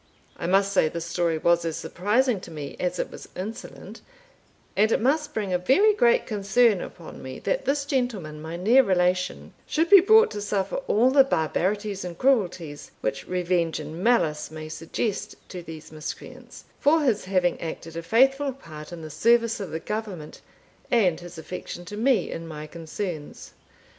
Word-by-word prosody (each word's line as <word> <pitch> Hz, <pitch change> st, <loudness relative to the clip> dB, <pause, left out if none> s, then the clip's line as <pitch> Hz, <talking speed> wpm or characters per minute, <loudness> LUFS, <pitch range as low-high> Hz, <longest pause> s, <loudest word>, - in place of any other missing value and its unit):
I -, -, -4 dB
must 195 Hz, +2 st, +3 dB
say 160 Hz, -5 st, +3 dB
this 170 Hz, +1 st, -5 dB
story 170 Hz, -1 st, 0 dB
was 170 Hz, +1 st, +2 dB
as 165 Hz, -1 st, -2 dB
surprising 220 Hz, +4 st, +1 dB
to -, -, -11 dB
me 150 Hz, -3 st, -7 dB
as 180 Hz, 0 st, -1 dB
it -, -, -3 dB
was -, -, -11 dB
insolent; 205 Hz, +5 st, -8 dB, 0.7 s
and 215 Hz, +2 st, +3 dB
it -, -, +3 dB
must 295 Hz, +5 st, +1 dB
bring 205 Hz, -4 st, -1 dB
a 180 Hz, -, +2 dB
very 390 Hz, -, +4 dB
great 475 Hz, +2 st, +3 dB
concern 210 Hz, 0 st, +2 dB
upon 170 Hz, -, -9 dB
me, 130 Hz, 0 st, -7 dB
that -, -, -1 dB
this 280 Hz, 0 st, 0 dB
gentleman, 220 Hz, -, -2 dB
my 160 Hz, +2 st, -6 dB
near 225 Hz, +9 st, +5 dB
relation, 180 Hz, -4 st, 0 dB
should 325 Hz, +3 st, 0 dB
be 400 Hz, -, +11 dB
brought 440 Hz, +4 st, +6 dB
to 210 Hz, -, -5 dB
suffer 200 Hz, -2 st, -1 dB
all 240 Hz, +5 st, +4 dB
the 275 Hz, 0 st, +7 dB
barbaritys 200 Hz, -, -1 dB
and 175 Hz, -2 st, -6 dB
crueltys, 180 Hz, -, 0 dB
which 110 Hz, -, -3 dB
revenge 175 Hz, -3 st, 0 dB
and 155 Hz, +4 st, -7 dB
mallice 160 Hz, -11 st, +2 dB
may 155 Hz, 0 st, -8 dB
suggest 200 Hz, +6 st, -3 dB
to 180 Hz, -, -6 dB
these 160 Hz, -2 st, -10 dB
miscreants, 155 Hz, -1 st, -9 dB
for 310 Hz, +3 st, +4 dB
his 230 Hz, -9 st, +1 dB
haveing 185 Hz, -2 st, +1 dB
acted 165 Hz, 0 st, -6 dB
a 165 Hz, -, -3 dB
faithfull 270 Hz, +8 st, +3 dB
part 155 Hz, -, -11 dB
in 170 Hz, -2 st, -8 dB
the 155 Hz, -, -7 dB
service 230 Hz, +8 st, +3 dB
of 195 Hz, -4 st, -5 dB
the 160 Hz, -, -4 dB
Government, 200 Hz, -7 st, -6 dB, 0.5 s
and 190 Hz, -9 st, +3 dB
his 175 Hz, -1 st, -11 dB
affection 175 Hz, +1 st, -7 dB
to 205 Hz, -, -7 dB
me 225 Hz, -4 st, +2 dB
in 165 Hz, 0 st, -6 dB
my 155 Hz, -1 st, -7 dB
concerns. 165 Hz, 0 st, -6 dB
185 Hz, 175 wpm, -25 LUFS, 165-235 Hz, 0.7 s, be